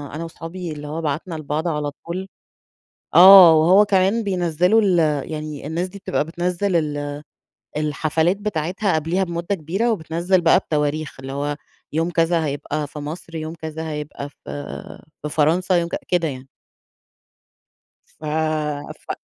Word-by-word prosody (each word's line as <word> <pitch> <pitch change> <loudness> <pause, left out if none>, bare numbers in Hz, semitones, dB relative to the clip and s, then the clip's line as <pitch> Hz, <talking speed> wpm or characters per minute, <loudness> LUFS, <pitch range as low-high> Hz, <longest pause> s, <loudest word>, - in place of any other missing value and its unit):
أنا 160 - -4
وصحابي 165 +1 -7
اللي 150 -1 -7
هو 160 +2 -4
بعتنا 160 +3 -3
لبعض 155 +2 -3
على 150 -3 -1
طول 185 +3 -4 0.9
آه، 185 0 +10
وهو 175 +6 +6
كمان 195 +3 +2
بينزّلوا 180 +1 +2
ال 190 -4 +3 0.3
يعني 155 -2 -6
الناس 170 +3 -2
دي 200 +2 -11
بتبقى 185 -6 -1
بتنزّل 175 +3 -1
ال 145 -2 -2 0.6
الحفلات 155 +4 0
بتاعتها 190 -1 -1
قبليها 165 +5 0
بمدة 170 +2 -2
كبيرة 190 +8 -1
وبتنزّل 175 -1 0
بقى 170 +2 +5
بتواريخ 150 -3 -2
اللي 135 +1 -7
هو 145 +1 -2 0.4
يوم 165 +2 +1
كذا 165 -1 +2
هيبقى 145 +1 -3
في 150 - -9
مصر، 165 +3 -7
يوم 160 0 -4
كذا 160 0 -6
هيبقى 150 -1 -6
في - - -30 0.9
في 150 - -4
فرنسا، 165 +5 +2
يوم 170 -1 0
ك - - -2
كده 175 -2 +1
يعني. 130 -2 -7 1.7
ف - - -15 0.8
ف - - -5
165 Hz, 145 wpm, -21 LUFS, 150-180 Hz, 1.7 s, آه